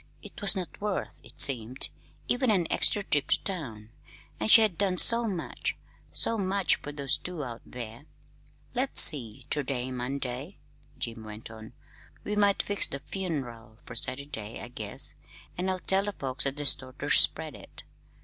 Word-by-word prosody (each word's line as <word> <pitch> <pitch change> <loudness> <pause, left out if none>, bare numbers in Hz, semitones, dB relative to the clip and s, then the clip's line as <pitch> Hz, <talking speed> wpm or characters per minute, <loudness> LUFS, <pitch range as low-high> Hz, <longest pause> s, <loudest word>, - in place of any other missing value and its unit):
It - - -11
was 205 0 +6
not 185 0 -6
worth, 205 -2 -4
it - - -15
seemed, 125 -1 +4 0.4
even 250 0 +1
an 190 -5 +2
extra 205 - +3
trip 145 -6 -1
to - - 0
town! 115 - -6 0.5
And - - -2
she 225 - +9
had 215 -5 +2
done 190 0 0
so 230 +3 +6
much 185 -6 -4 0.4
so 230 - +2
much 195 -1 +1
for 145 - -8
those 140 -2 0
two 180 -4 -6
out 120 -3 -8
there! 120 +2 -8 0.7
"Let's 260 +2 +2
see; 120 -8 +4
ter 150 - +1
day's 130 -2 -4
Monday," 130 +5 -5 0.4
Jim 115 -1 -5
went 110 +1 -9
on. 110 0 -12 0.5
"We 210 - -3
might 205 -1 +2
fix 205 0 +1
the 140 - -5
fun'ral 135 - -6
for - - -9
Saturday, 130 -6 -2
I 120 - -9
guess, 105 -4 0 0.4
an' 185 +2 -2
I'll 185 - -1
tell 195 +1 +2
the 205 - -4
folks 135 -3 0
at 140 +1 -3
the 145 - -4
store 130 -2 +3
ter - - -4
spread - - +5
it. - - -14
145 Hz, 175 wpm, -27 LUFS, 120-195 Hz, 0.7 s, she